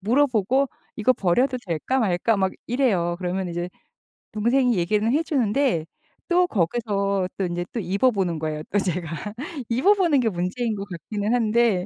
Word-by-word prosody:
물어보고 250 +2 +2 0.3
"이거 235 +4 +3
버려도 250 +7 +1
될까 180 - -1
말까?" 210 +1 +1
막 190 -1 +1 0.2
이래요. 210 -9 +1
그러면 185 0 -2
이제 175 +1 -3 0.7
동생이 240 +3 +2
얘기는 210 +5 +1
해 300 - +3
주는데 255 - +1 0.4
또 360 0 +3
거기서 200 - 0
또 195 - 0
인제 175 0 -3
또 235 - -3
입어보는 195 -3 +1
거예요. 155 -1 -3
또 205 - +2
제가 180 -4 -2 0.6
입어보는 330 - +3
게 230 - +2
문제인 205 +5 -2
것 200 -1 -5
같기는 205 +5 -3
한데 225 -5 +2
210 Hz, 325 characters per minute, -24 LUFS, 180-245 Hz, 0.7 s, 이거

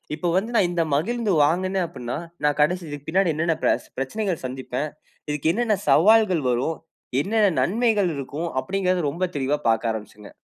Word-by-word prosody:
இப்ப 175 +3 -3
வந்து 215 +6 0
நான் 185 - +4
இந்த 175 -1 0
மகிழுந்து 220 +7 0
வாங்கினே 185 +5 +1
அப்டின்னா, 125 -1 -5 0.3
நான் 150 0 +2
கடைசி 180 +4 +2
இதுக்கு 145 0 -8
பின்னாடி 185 -1 +2
என்னென்ன 165 +1 0
பெச - - +2 0.2
பிரச்சனைகள் 175 +5 -2
சந்திப்பேன். 130 +3 -4 0.4
இதுக்கு 150 +2 0
என்னென்ன 225 -1 +1
சவால்கள் 190 0 +5
வரும், 125 +7 0 0.4
என்னென்ன 210 +1 +2
நன்மைகள் 210 -2 +2
இருக்கும், 150 +5 -4
அப்டின்கிறத 185 0 0
ரொம்ப 170 +6 -4
தெளிவா 140 +2 0
பார்க்க 115 0 +1
ஆரம்பிச்சங்க. 105 -1 -8
170 Hz, 155 wpm, -23 LUFS, 140-195 Hz, 0.4 s, சவால்கள்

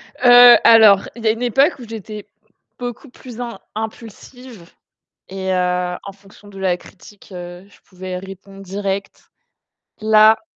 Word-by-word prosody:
Heu, 245 -1 +7
alors, 215 -4 +6
il 235 - -11
y - - 0
a - - +4
une 230 +2 -6
époque 270 +5 +1
où 235 - -11
j'étais 215 -1 -9 0.5
beaucoup 245 +3 -8
plus 245 -1 -13
im 235 -1 -7 0.2
impulsive 220 -1 -10 0.6
et 190 0 -4
heu, 180 -1 -1
en 200 - -9
fonction 200 +1 -20
de 195 - -13
la 185 -2 -1
critique, 195 +2 -18
heu, 175 +1 -10
je - - -24
pouvais 185 -1 -8
répondre 195 +1 -13
direct. 195 +1 -6 0.7
Là 215 0 +4
205 Hz, 150 wpm, -18 LUFS, 190-230 Hz, 0.7 s, Heu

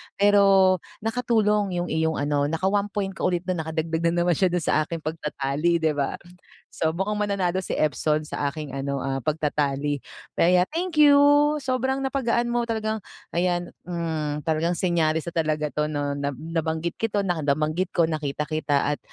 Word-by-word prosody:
Pero 195 -2 +5 0.2
nakatulong 215 -4 +1
yung 175 0 -2
iyong 160 0 +1
ano 145 0 0
naka-1 190 +6 0
point 195 -2 -1
ka 190 - -1
ulit 180 -1 -1
na 185 -2 -2
nakadagdag 160 +1 -1
na 175 +1 +1
naman 175 - +2
siya 190 - +4
do'n 175 -2 -1
sa 155 0 +1
aking 165 -2 -5
pagta-tally 155 +1 -1
di 160 - +3
ba? 145 -2 -1 0.6
So 160 - +1
mukhang 195 +5 -2
mananalo 190 -2 0
si - - -6
Epson 150 +1 0
sa 140 -1 -2
aking 150 -3 -7
ano, 140 0 -2
ah, 135 0 -2
pagta-tally. 145 -2 -1 0.3
Kaya, 180 +1 +4
thank 335 -1 -2
you 290 -1 +8 0.5
sobrang 260 +1 -1
napagaan 240 -3 0
mo 240 -1 0
talagang 220 -1 -2 0.3
ayan, 175 0 0 0.2
hmm, 160 -4 -3
talagang 165 +2 0
senyales 160 -3 +1
na 170 - -6
talaga 155 -2 0
'to, 150 0 -1
'no 145 -1 -2
na 140 -1 -2
nabanggit 160 +2 -3
ko 225 - +1
'to 205 -1 0
na 175 -3 -1
nabanggit 155 +5 0
ko 170 - +4
nakita 150 -2 -2
kita 150 -2 0
at - - -6
165 Hz, 175 wpm, -24 LUFS, 150-195 Hz, 0.6 s, you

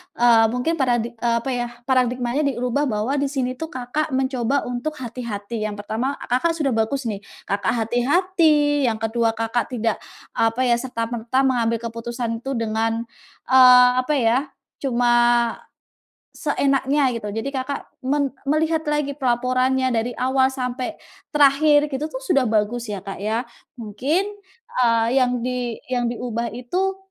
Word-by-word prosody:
eee, 235 -2 +5
mungkin 250 +8 -1
paradi 240 -3 +1
eee, 235 0 +1
apa 270 - -2
ya, 245 -1 -1 0.2
paradigmanya 255 +2 +1
diubah 260 +2 0
bahwa 235 +5 -1
di 280 - +1
sini 255 -2 -3
itu 320 - -3
Kakak 260 +3 -3
mencoba 265 0 0
untuk 245 +5 -4
hati-hati. 230 -4 -5
Yang 205 -1 -6
pertama, 240 +7 -2 0.2
Kakak 330 +7 +2
sudah 295 -5 0
bagus 225 +4 0
nih, 215 -4 -3 0.2
Kakak 200 +4 -1
hati-hati, 290 - +2
yang 225 - +1
kedua 225 0 +1
Kakak 225 0 -1
tidak 225 -1 -1 0.3
apa 225 +3 +1
ya, 240 -2 +3
serta-merta 240 +1 -1
mengambil 230 -3 0
keputusan 230 0 -4
itu 270 +3 -4
dengan, 225 0 -1 0.5
eee, 250 -1 +8
apa 255 +4 0
ya, 255 +2 +2 0.3
cuma, 245 -3 +1 1.2
seenaknya 275 -2 +1
gitu. 220 -3 -4
Jadi 225 +7 -4
Kakak 270 +1 -4 0.2
men 280 -2 +1 0.2
melihat 315 +2 +1
lagi 295 -1 0
pelaporannya 255 0 +1
dari 235 +1 -1
awal 260 +1 +2
sampai 255 +2 -4 0.3
terakhir 290 0 +4
gitu 295 +4 -2
tuh - - -5
sudah 320 - +1
bagus 220 +2 0
ya 200 -2 -5
Kak 195 -1 -6
ya. 220 +4 -1 0.3
Mungkin, 275 - -1 0.5
eee, 230 -2 +3
yang 250 -2 +1
di 250 -2 -2 0.2
yang 245 -1 0
diubah 235 -1 -3
itu 360 - -2
250 Hz, 145 wpm, -22 LUFS, 230-275 Hz, 1.2 s, eee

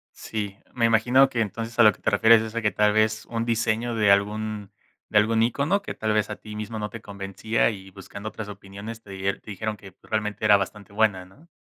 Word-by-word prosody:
Sí, 105 -2 -5 0.2
me 115 -2 +1
imagino 125 +4 +4
que 120 - -3
entonces, 115 +3 -4
a - - +9
lo 105 - +7
que - - -21
te - - +1
refieres 115 0 +6
es 110 0 -6
a 115 - -1
que, 105 - +1
tal 105 0 +3
vez, 110 0 +1
un 115 0 -2
diseño 115 0 0
de 105 -2 +4
algún 105 0 0 0.4
de 105 - +2
algún 110 +2 +4
ícono 145 - +1
que - - -6
tal 110 -1 -1
vez 110 0 +1
a 105 - -5
ti 105 -1 -10
mismo 110 +1 -5
no 105 0 -3
te 115 - -9
convencía 100 +3 -1
y 95 -3 -8
buscando 100 +2 -8
otras 110 -1 -7
opiniones 100 +3 -9
te 100 - -18
dier 95 +1 -2
te 110 - -10
dijeron 105 +2 -3
que 95 -2 -14
realmente 105 0 -2
era 105 -1 +7
bastante 100 +1 -6
buena, 105 -4 +1
¿no? 140 - -20
110 Hz, 235 wpm, -25 LUFS, 100-115 Hz, 0.4 s, a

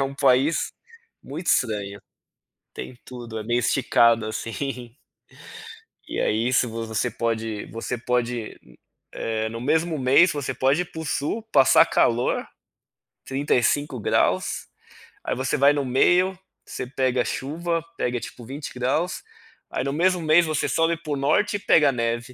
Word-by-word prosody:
é - - +2
um 135 0 -3
país 140 +2 +2 0.5
muito 160 +6 -7
estranho. 100 -4 0 0.7
Tem 125 - -8
tudo, 120 -3 -8
é 110 - -6
meio 120 +2 +1
esticado 115 -2 +3
assim. 120 +2 -5 1.1
E - - -4
aí 110 +2 +1
isso 125 -1 +2
você 115 +1 -2
pode 110 -2 -3
você 115 +2 -5
pode, 120 -1 -2 0.7
eh, 110 -1 -1
no 115 +1 -6
mesmo 160 +4 0
mês 140 +7 +5
você 140 -3 -3
pode 135 +6 +2
ir - - 0
para 160 - -7
o - - -7
sul 150 - -2
passar 135 -2 +6
calor, 120 +1 +1 0.8
35 140 0 0
graus, 105 - 0 0.6
aí - - -2
você 130 +1 -1
vai 140 +2 +5
no 145 -1 -1
meio, 180 +9 +3 0.3
você 125 - -6
pega 130 -1 0
a - - -2
chuva, 165 +4 -2
pega 125 0 -1
tipo 120 +1 -9
20 140 +5 -7
graus, 135 +8 -1 0.5
aí - - -2
no 140 +1 -2
mesmo 180 +3 +2
mês 160 +2 +5
você 155 - 0
sobe 165 +1 +1
para 155 -2 -5
o - - 0
norte 205 +10 +1
e - - -12
pega 155 -6 +4
a - - +2
neve. 115 0 -2
130 Hz, 155 wpm, -24 LUFS, 115-150 Hz, 1.1 s, passar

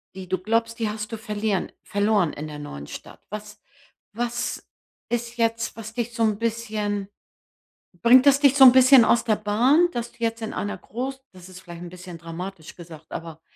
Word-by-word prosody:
die 190 -1 -8
du 185 +1 0
glaubst, 230 +3 -1
die 220 -2 0
hast 210 +1 -5
du 225 - -4
verlieren 210 -2 -2
verloren 205 -5 +1
in 150 +2 -6
der 150 -1 -8
neuen 70 - -8
Stadt? - - -10
Was 210 0 -8 0.5
was 240 +2 -3 0.4
ist 240 0 -3
jetzt, 230 0 0
was 225 0 -8
dich 240 0 -3
so 230 -1 0
‘n 215 -2 +2
bisschen 215 -3 -2 1.0
bringt 250 +3 +7
das 280 0 +6
dich 280 -1 +5
so 270 - +9
‘n 250 - +10
bisschen 260 -1 +7
aus 235 - +3
der 215 -2 +2
Bahn, 250 +11 +3
dass 240 0 -4
du - - -25
jetzt 230 0 -2
in 220 - -4
einer 205 - -3
Gross 265 +3 -5
das 185 -1 -14
ist 185 0 -12
vielleicht 175 -1 -10
‘n 175 - -8
bisschen 180 -2 -10
dramatisch 170 +1 -8
gesagt, 165 -3 -13
aber 165 -1 -7
215 Hz, 195 wpm, -24 LUFS, 185-235 Hz, 1.0 s, n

